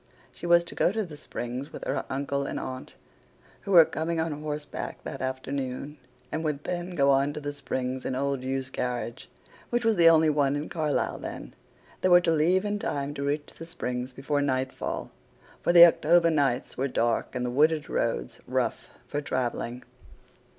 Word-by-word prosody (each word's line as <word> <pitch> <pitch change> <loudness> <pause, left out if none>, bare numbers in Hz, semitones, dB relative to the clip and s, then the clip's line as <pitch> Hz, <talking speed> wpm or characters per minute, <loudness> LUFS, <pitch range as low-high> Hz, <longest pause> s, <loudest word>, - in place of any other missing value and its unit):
She 175 - -7
was 170 0 +6
to 170 - -9
go - - +2
to 215 0 -1
The 160 -4 -10
Springs 125 -1 -6
with - - -8
her - - -2
uncle 140 +1 -1
and - - -3
aunt, 130 0 -7 0.7
who 200 - -5
were 170 -3 +9
coming 160 +2 -2
on 160 0 0
horseback 150 0 -5
that - - -6
afternoon, 130 +2 -4 0.3
and 160 - -2
would 150 -2 -2
then 175 0 -4
go 140 -2 +4
on 140 +1 +2
to 150 - -5
The 145 -1 -4
Springs 130 -2 -3
in 130 - -2
old 140 0 -1
Hugh's 130 0 -3
carriage, 125 -1 -4 0.4
which 240 -1 0
was 225 -3 +3
the 165 -1 +8
only 160 -1 +5
one 145 -1 +2
in 145 +1 -4
Carlyle 155 -3 -1
then. - - -7 0.5
They 185 - +3
were 175 0 +8
to 165 - +1
leave 175 +5 +3
in 205 0 -1
time 145 -5 -2
to 140 - -6
reach 145 +1 -2
The 165 - -9
Springs 125 -5 -4
before 135 +3 -1
nightfall, 130 -2 -2 0.5
for - - +2
the 170 0 +11
October 170 0 +4
nights 140 -5 0
were 135 - 0
dark 120 -3 0
and 125 0 -1
the 125 - -2
wooded 150 +3 +3
roads - - -2
rough - - -1 0.2
for 145 - -2
travelling. 125 -2 -3
145 Hz, 185 wpm, -27 LUFS, 130-165 Hz, 0.7 s, the